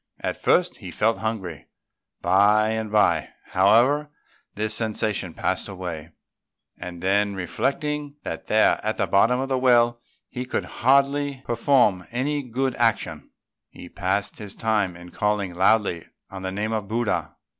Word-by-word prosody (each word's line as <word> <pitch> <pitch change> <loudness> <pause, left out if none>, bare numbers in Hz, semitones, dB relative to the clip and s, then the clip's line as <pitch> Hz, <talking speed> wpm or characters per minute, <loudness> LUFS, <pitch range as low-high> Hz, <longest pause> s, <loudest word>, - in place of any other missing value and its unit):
At - - -2
first - - +2
he - - -9
felt 110 -1 0
hungry; 100 -8 -4 0.6
by 105 +3 +4
and 110 -1 -3
by, 85 -8 +2 0.2
however, 120 +10 +3 0.5
this 110 +1 -1
sensation 110 -5 -1
passed - - -1
away; 90 -5 -6 0.7
and 85 -1 -8
then 100 +1 +2
reflecting 145 - -2
that - - -6
there, 110 0 +3
at 110 +1 -1
the 100 - +1
bottom 105 +7 +3
of 135 +1 -3
a 130 - +1
well, 120 -2 +3 0.3
he 125 - -5
could 130 - -3
hardly 140 +1 +1
perform 115 -6 +2
any 145 +5 -1
good 130 0 -2
action, 115 -2 0 0.4
he 90 - -12
passed 100 +1 -2
his 105 -2 -8
time 105 -5 0
in 90 0 -12
calling 105 -3 -1
loudly 95 -1 +2 0.2
on 95 -1 -7
the 95 0 -3
name 105 +3 -2
of 105 -3 -3
Buddha. 115 0 -1
110 Hz, 145 wpm, -24 LUFS, 95-125 Hz, 0.7 s, by